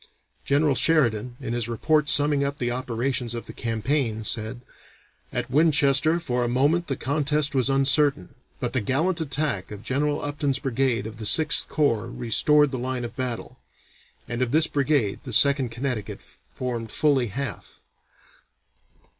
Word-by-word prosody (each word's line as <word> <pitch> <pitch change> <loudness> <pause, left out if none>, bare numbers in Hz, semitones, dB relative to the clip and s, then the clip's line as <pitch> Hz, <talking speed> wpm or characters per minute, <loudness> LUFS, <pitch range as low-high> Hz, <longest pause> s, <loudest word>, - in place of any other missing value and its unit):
General 145 +1 +2
Sheridan, 125 -6 +1
in 115 - -4
his 120 -1 -2
report 150 +5 +1
summing 145 -1 +3
up 140 0 -3
the 120 -1 -2
operations 125 0 -2
of 115 - -6
the - - -10
campaign, 115 0 -2
said: 110 +2 -2 0.7
"At - - -3
Winchester 155 +1 +3
for 125 -7 -1
a - - 0
moment 145 +8 +1
the 135 - -2
contest 150 +2 0
was 130 -1 +1
uncertain, 135 - +2 0.3
but - - -3
the - - +1
gallant 160 - 0
attack 140 - -2
of 105 0 -9
General 145 +4 -1
Upton's 145 -2 -1
brigade 130 -2 -1
of 110 0 -8
the 110 - -6
Sixth 155 +7 +3
Corps 115 -7 0
restored 125 +5 +2
the 130 - -4
line 125 0 -3
of 115 0 -9
battle," 125 -3 -5 0.7
and 120 +1 -4
of 125 - +1
this 155 +2 +4
brigade 140 -9 0
the 130 - -7
Second 140 +1 +4
Connecticut 120 -3 -4 0.3
formed 120 -3 -4
fully 140 -5 +2
half. 120 -1 -6
130 Hz, 155 wpm, -24 LUFS, 120-145 Hz, 0.7 s, this